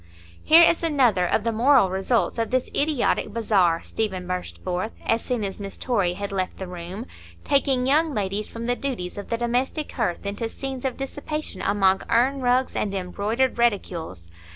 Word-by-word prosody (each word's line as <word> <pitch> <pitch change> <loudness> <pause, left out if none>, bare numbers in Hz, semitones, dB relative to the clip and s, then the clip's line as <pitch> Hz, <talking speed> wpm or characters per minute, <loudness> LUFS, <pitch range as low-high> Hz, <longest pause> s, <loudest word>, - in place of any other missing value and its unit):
"Here 330 +2 +8
is 335 0 +4
another 255 - +3
of 210 - +1
the 230 - 0
moral 235 -3 +4
results 195 +5 0
of 225 - 0
this 255 0 0
idiotic 290 -3 +1
bazaar," 190 -7 +2
Stephen 190 -5 -3
burst 180 0 -5
forth, 185 +4 -2
as 225 0 +2
soon 245 -4 -2
as 195 0 -4
Miss 195 -1 -7
Torry 200 -8 0
had 200 +1 -5
left 185 -2 -2
the 190 - -5
room,—"taking 235 +8 -2
young 305 +4 +3
ladies 200 +1 -1
from 230 0 -7
the 245 +1 +1
duties 220 -10 -4
of 200 - -8
the 230 - 0
domestic 245 +5 -1
hearth 210 -7 -2
into 205 +3 -3
scenes 270 +1 -6
of 260 -2 -2
dissipation 290 +3 -5
among 195 -2 +2
urn 260 +4 +2
rugs 250 +1 +1
and 200 -1 -1
embroidered 210 +7 -1
reticules! 170 - -1
230 Hz, 175 wpm, -24 LUFS, 190-260 Hz, -, Here